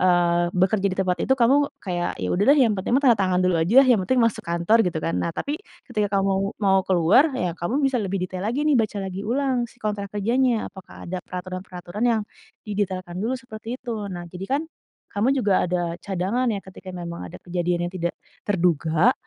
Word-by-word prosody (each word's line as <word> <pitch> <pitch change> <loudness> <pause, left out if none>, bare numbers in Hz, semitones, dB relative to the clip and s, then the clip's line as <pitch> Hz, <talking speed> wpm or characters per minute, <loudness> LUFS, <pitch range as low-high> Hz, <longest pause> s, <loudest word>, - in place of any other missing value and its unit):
eee, 175 -1 +3
bekerja 190 +2 +2
di - - -4
tempat 180 -2 +1
itu 265 - +3
kamu 250 +2 +4 0.3
kayak, 175 -2 -2
"Ya 90 - -1
udah 195 - +2
deh, 295 - +4
yang 225 - +2
penting 190 - -2
mah 280 - +1
tanda 240 -4 +6
tangan 185 -1 +2
dulu 180 -1 +3
ajalah, 255 +11 +6
yang 225 - +5
penting 255 +5 +2
masuk 230 -2 0
kantor," 170 +6 +2
gitu 170 -3 -1
kan. 165 - -1
Nah 170 - -1
tapi 295 +2 -3 0.3
ketika 210 -1 0
kamu 195 0 0
mau 195 -1 +4
keluar 190 - +4
ya 180 -9 -1
kamu 245 - -1
bisa 265 -2 +2
lebih 195 0 -2
detail 185 +1 -5
lagi 250 +7 0
nih, 300 -2 +4
baca 215 -1 -2
lagi 190 0 -5
ulang 250 -1 0
si - - -22
kontrak 205 -1 -2
kerjanya, 235 +3 +1
apakah 190 -1 -12
ada 185 +1 -3
peraturan-peraturan 185 +2 -5
yang 225 -2 +2 0.4
didetailkan 190 -4 -3
dulu 240 +4 0
seperti 240 -2 -7
itu. 245 - -6 0.2
Nah 175 -1 -6
jadi 180 +2 -7
kan 310 - -3 0.5
kamu 205 +4 +1
juga 210 -6 +2
ada 180 0 0 0.2
cadangan 200 +6 -1
ya 200 - -3
ketika 190 0 -12
memang 170 -1 -6
ada - - -10
kejadian 175 0 -1
yang - - -13
tidak 170 -1 -2 0.3
terduga, 175 - +3
195 Hz, 200 wpm, -24 LUFS, 180-230 Hz, 0.5 s, tanda